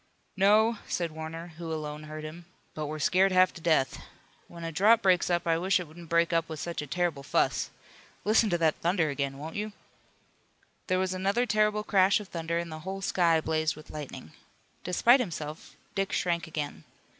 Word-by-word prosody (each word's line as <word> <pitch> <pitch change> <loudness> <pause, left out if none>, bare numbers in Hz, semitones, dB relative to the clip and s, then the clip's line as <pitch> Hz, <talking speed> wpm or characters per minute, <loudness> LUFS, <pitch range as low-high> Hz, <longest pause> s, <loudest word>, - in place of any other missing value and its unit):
"No," 210 +3 +4
said 170 -2 -2
Warner, 160 +2 -7
who 165 -1 -5
alone 150 -1 -5
heard 155 0 -7
him, 165 +3 -8 0.3
"but 155 -1 -4
we're 155 +1 -4
scared 185 +5 +3
half 185 0 +4
to 170 - -11
death. 160 -5 +1 0.5
When 170 -1 -10
a 165 - -3
drought 210 +8 +4
breaks 185 -2 +3
up 175 0 +1
I 165 -1 +2
wish 185 +2 +2
it 180 - -6
wouldn't 165 +1 -13
break 170 0 +2
up 165 0 +1
with 160 -2 -6
such 170 0 -4
a 150 - -7
terrible 170 -1 -1
fuss. 140 - 0 0.6
Listen 215 +1 +4
to 175 - +1
that 160 -2 +2
thunder 170 -3 +1
again, 140 -1 -3
won't 155 +3 -7
you!" 210 0 -3 1.1
There 185 -2 +2
was 185 0 0
another 195 +6 +1
terrible 210 -1 +2
crash 195 -1 +4
of 210 - -10
thunder 170 0 -2
and 170 -1 -3
the 155 - -6
whole 190 +4 -6
sky 170 -3 +3
blazed 155 0 0
with 155 0 -13
lightning. 145 - -8 0.5
Despite 235 +8 +4
himself 160 -8 -5 0.2
Dick 195 -1 -1
shrank 170 -1 0
again. 145 - -5
170 Hz, 190 wpm, -29 LUFS, 155-190 Hz, 1.1 s, No